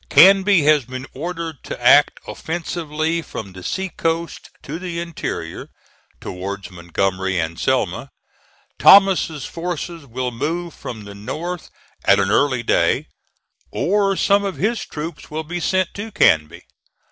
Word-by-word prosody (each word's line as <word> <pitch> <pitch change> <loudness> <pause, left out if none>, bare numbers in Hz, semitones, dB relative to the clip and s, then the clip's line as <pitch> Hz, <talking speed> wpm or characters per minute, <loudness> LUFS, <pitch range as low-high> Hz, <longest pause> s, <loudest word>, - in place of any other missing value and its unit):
Canby 195 -2 +6
has 150 -1 +4
been 130 +1 -7
ordered 165 0 -5
to - - -7
act - - +5
offensively 160 -1 -3
from 100 - -8
the 95 - -10
sea 190 - -3
coast 165 -1 -3
to 155 +4 -6
the 175 -2 -4
interior, 165 - -5 0.5
towards 95 +1 -6
Montgomery 95 +2 -1
and 80 0 -2
Selma. - - 0 0.7
Thomas's 190 -7 +6
forces 170 -2 -5
will 125 +1 -3
move 165 +7 -3
from 110 -3 -8
the 100 0 -10
north 160 - -5 0.3
at - - +5
an 95 - +1
early 130 0 +2
day, - - +1 0.6
or 195 +1 +1
some 200 +1 +3
of 195 -2 -3
his 225 +4 0
troops 160 +3 -7
will 155 +1 -4
be 175 +3 -4
sent 185 +1 0
to 220 +2 -6
Canby. 75 - +2
160 Hz, 135 wpm, -20 LUFS, 115-175 Hz, 0.7 s, Canby